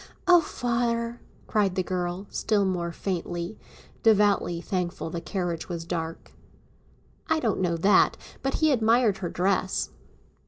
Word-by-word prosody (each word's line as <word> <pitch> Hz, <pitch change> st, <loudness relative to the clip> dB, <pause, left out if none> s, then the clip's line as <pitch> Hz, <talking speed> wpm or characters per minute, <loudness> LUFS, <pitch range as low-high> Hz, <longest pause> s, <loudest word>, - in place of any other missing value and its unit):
"Oh, 355 Hz, -1 st, +8 dB
father," 235 Hz, -3 st, -1 dB, 0.2 s
cried 200 Hz, -4 st, +1 dB
the 185 Hz, -, +1 dB
girl, 180 Hz, +1 st, -3 dB
still 210 Hz, -2 st, +1 dB
more 175 Hz, -2 st, -1 dB
faintly, 175 Hz, +1 st, -4 dB, 0.4 s
devoutly 205 Hz, -5 st, +3 dB
thankful 180 Hz, -2 st, -3 dB
the 170 Hz, -, -4 dB
carriage 175 Hz, 0 st, -3 dB
was 170 Hz, -2 st, -4 dB
dark. 165 Hz, -1 st, -4 dB, 1.0 s
"I 315 Hz, -, +2 dB
don't 225 Hz, -8 st, 0 dB
know 170 Hz, -2 st, +1 dB
that; 195 Hz, +5 st, +4 dB, 0.2 s
but 270 Hz, 0 st, -1 dB
he 315 Hz, -1 st, +3 dB
admired 225 Hz, -3 st, +3 dB
her 175 Hz, -3 st, -3 dB
dress." 185 Hz, +1 st, 0 dB
190 Hz, 130 wpm, -26 LUFS, 175-225 Hz, 1.0 s, Oh